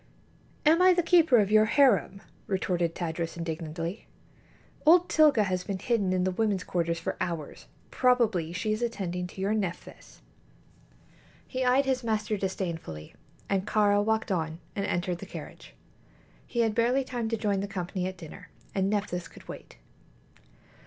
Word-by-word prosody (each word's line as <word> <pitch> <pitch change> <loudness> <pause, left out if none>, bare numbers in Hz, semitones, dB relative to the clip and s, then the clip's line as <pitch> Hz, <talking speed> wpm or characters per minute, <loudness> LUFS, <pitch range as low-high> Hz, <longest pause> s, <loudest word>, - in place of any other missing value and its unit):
"Am 320 +3 +5
I 365 0 +6
the 350 - +2
keeper 330 -6 +5
of 205 -2 +2
your 215 0 +6
harem?" 230 -6 +3 0.2
retorted 175 -3 -1
Tadros, 165 -1 -3
indignantly. 165 +2 -5 0.8
"Old 345 +3 +6
Tilga 300 -8 +5
has 185 -2 -1
been 195 +1 -3
hidden 210 -3 0
in 185 -1 +1
the 185 - +1
women's 200 -1 0
quarters 170 -1 -1
for 165 - -3
hours. 165 -4 -4 0.2
Probably 225 -10 +2
she 215 +5 -1
is 215 - -3
attending 180 -6 -3
to 185 - -12
your 195 +2 0
Nephthys." 190 -5 -5 1.3
He 260 0 -2
eyed 255 +2 +3
his 260 -2 0
master 215 -1 -1
disdainfully, 170 - -4 0.3
and 195 0 -1
Kāra 205 -1 +3
walked 220 0 0
on 160 -3 -1 0.2
and 200 0 -2
entered 175 0 -1
the - - -8
carriage. - - -10 0.7
He 235 - 0
had 225 -2 +1
barely 240 +4 +2
time 240 -3 -3
to 225 - -1
join 205 -2 0
the 200 - -3
company 185 -1 -3
at 185 0 -6
dinner, 160 -4 -11 0.2
and 195 0 +1
Nephthys 200 -4 -2
could - - -16
wait. - - -10
200 Hz, 160 wpm, -28 LUFS, 180-230 Hz, 1.3 s, I